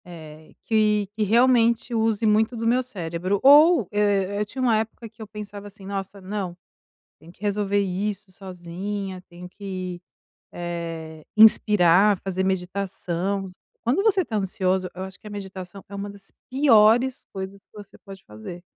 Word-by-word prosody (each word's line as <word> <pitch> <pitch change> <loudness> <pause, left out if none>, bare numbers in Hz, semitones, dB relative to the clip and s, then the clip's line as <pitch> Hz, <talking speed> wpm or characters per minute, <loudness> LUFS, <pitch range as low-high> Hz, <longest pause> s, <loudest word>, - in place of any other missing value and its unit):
É, 160 -3 -12
que 210 -2 +2
que 220 - -4
realmente 235 +2 +3
use 225 -1 +1
muito 215 +3 +3
do 225 - -3
meu 245 +3 +3
cérebro, 185 -4 -3
ou, 290 - +7
eh 205 -1 +1
eh, - - 0
tinha 260 - -9
uma 235 -4 +3
época 225 +1 -4
que 220 0 -17
eu 215 - -7
pensava 205 0 -9
assim: 200 -1 -13
"Nossa, 195 0 -5
não! 190 -2 -5 0.6
Tenho 165 +3 -15
que - - -32
resolver 205 -1 0
isso 200 +1 -3
sozinha, 185 +1 -6
tenho 175 +1 -11
que, 185 -2 -6 0.5
eh, 165 -2 -6
inspirar, 210 -3 +6
fazer 190 -1 -1
meditação". 190 0 -2 0.3
Quando 250 +11 +1
você 400 -3 +3
tá 220 -9 -3
ansioso, 185 -1 -1
eu 185 - -5
acho 190 -1 -9
que - - -13
a - - -7
meditação 195 -2 -8
é 200 - -8
uma 200 +1 -5
das 200 -1 -13 0.2
piores 250 -2 +4
coisas 195 0 -6
que 195 - -45
você 205 -1 -12
pode 195 -2 -13
fazer. 110 +12 -9
200 Hz, 160 wpm, -24 LUFS, 185-215 Hz, 0.6 s, ou